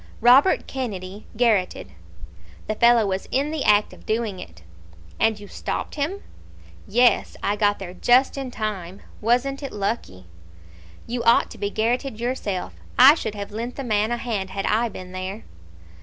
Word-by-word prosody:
"Robert 255 +10 +5
Kennedy 205 -6 -6
garrotted!" 220 -6 +1 0.7
"The 215 - -2
fellow 235 0 +4
was 190 -1 -3
in 280 +3 0
the 310 -3 -2
act 210 0 +3
of - - -15
doing 215 -4 -2
it." 85 - -12 0.6
"And 220 -1 +2
you 205 - -11
stopped - - -4
him?" 315 +8 -3 0.6
"Yes; 245 +4 +3
I 205 - +1
got 205 -1 +2
there 185 -2 -8
just 250 +7 +3
in 270 -2 -4
time. 200 -5 -5 0.2
Wasn't 250 +5 +1
it 275 - -5
lucky?" 200 - -4 0.8
"You 240 +1 -3
ought 230 - +4
to - - -11
be 200 - -1
garrotted 230 +3 -1
yourself. 230 -6 -3 0.2
I 265 +4 +9
should 220 -9 -4
have 200 0 -6
lent 230 +4 -5
the 275 - -5
man 215 -2 +1
a 240 - 0
hand 215 -6 -3
had 195 +1 -4
I 230 +2 +1
been 185 -3 -9
there." 185 +3 -6
220 Hz, 165 wpm, -23 LUFS, 200-245 Hz, 0.8 s, I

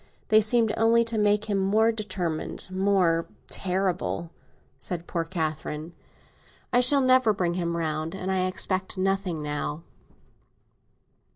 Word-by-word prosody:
They 215 0 +6
seemed 220 0 +3
only 230 +1 +4
to 230 -1 -2
make 210 0 +2
him 205 -2 0
more 215 +4 +3
determined—more 185 -2 -1 0.2
terrible," 185 -3 -2 0.5
said 175 -2 -4
poor 170 -2 -2
Catherine. 160 -1 -4 0.8
"I 245 - +5
shall 275 +3 +4
never 255 -4 +4
bring 180 -3 -1
him 170 -1 -2
round, 155 +1 -2
and 190 0 -3
I 185 -1 +1
expect 185 +1 0
nothing 190 -4 -1
now." 150 +1 -4
190 Hz, 120 wpm, -26 LUFS, 170-215 Hz, 0.8 s, They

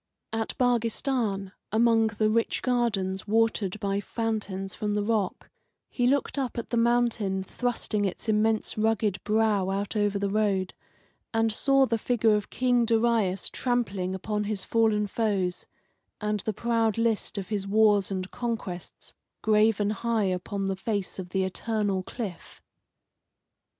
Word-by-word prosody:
At 225 0 -2
Baghistan, 230 -4 0 0.2
among 225 0 +4
the 215 0 0
rich 230 +1 0
gardens 215 -7 0
watered 215 -2 +1
by 200 0 -1
fountains 205 -3 -3
from 210 -2 -2
the 210 - +1
rock, 210 -3 -1 0.4
he 245 -1 +1
looked 280 +1 +1
up 260 -3 -3
at 235 - -5
the - - +1
mountain 230 -5 +1
thrusting 225 -1 -2
its 195 +3 -3
immense 220 0 +1
rugged 215 -2 +1
brow 210 -3 +2
out 200 +2 -2
over 205 -1 +1
the 200 0 -1
road, 200 -3 +1 0.6
and 225 -1 +2
saw 275 +3 +4
the 230 -2 -1
figure 225 -1 +2
of 210 -1 -1
King 245 -1 +2
Darius 225 -5 +2
trampling 200 -7 -1
upon 210 +2 -2
his 205 -2 -2
fallen 220 -2 +2
foes, 195 -4 -1 0.5
and 210 -1 -1
the 220 - -2
proud 230 0 0
list 230 -2 0
of 195 -2 -4
his 200 -2 -2
wars 205 -1 +4
and 185 -1 -4
conquests 215 -7 -5 0.3
graven 215 -1 +3
high 225 +1 0
upon 195 +1 -2
the 195 0 -1
face 200 -1 -3
of 180 -1 -6
the 190 +1 0
eternal 200 0 -1
cliff. 190 -3 -7
215 Hz, 145 wpm, -27 LUFS, 195-230 Hz, 0.6 s, among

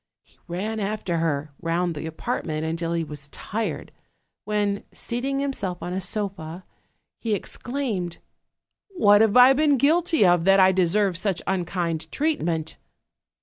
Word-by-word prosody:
He - - -28
ran 205 +5 -3
after 200 -4 -2
her 155 -3 -1
round 170 +1 0
the 155 +1 -5
apartment 160 -3 -3
until 165 +1 -2
he 165 -1 0
was 150 -2 -7
tired, 215 +9 -4 0.5
when, 205 -1 0
seating 270 +3 -3
himself 230 -11 -3
on 175 - -4
a 190 - -2
sofa, 190 -4 -4 0.5
he 220 -3 0
exclaimed: 220 -6 -3 0.7
"What 210 - +4
have 220 +1 +4
I 250 +2 +9
been 290 0 +3
guilty 320 - +3
of 175 -2 +4
that 195 0 +6
I 190 0 +7
deserve 190 0 +2
such 195 -3 -1
unkind 175 -3 -2
treat 310 +1 0
ment?" 160 -1 -2
190 Hz, 145 wpm, -24 LUFS, 170-225 Hz, 0.7 s, I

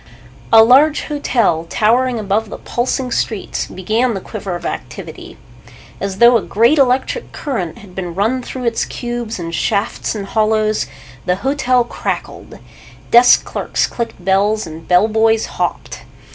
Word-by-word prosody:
A 225 -1 +9
large 280 +6 +5
hotel, 230 - 0
towering 245 +3 +2
above 215 +1 -1
the - - -7
pulsing 250 +1 -2
streets, 220 -4 -2
began 220 +6 -1
the - - -3
quiver 195 -2 -6
of 175 - -7
activity. - - -7 0.6
As 195 -1 -4
though 235 +1 +6
a - - -2
great 235 +11 +2
electric 265 - +1
current 225 - -4
had 195 -3 -14
been 180 -2 -5
run 225 +7 0
through 255 +1 -7
its 235 -1 0
cubes 240 -2 -5
and 170 -2 -6
shafts 200 +5 -1
and 200 -2 -4
hollows, 215 0 +1 0.4
the 180 - +2
hotel 255 -3 +2
crackled. 235 - -5 0.5
Desk 240 +1 +6
clerks - - -1
clicked 230 -6 -6
bells 200 +3 +2
and 160 0 -10
bell 180 +4 +4
boys 225 0 +2
hopped. - - -4
220 Hz, 145 wpm, -17 LUFS, 195-245 Hz, 0.6 s, A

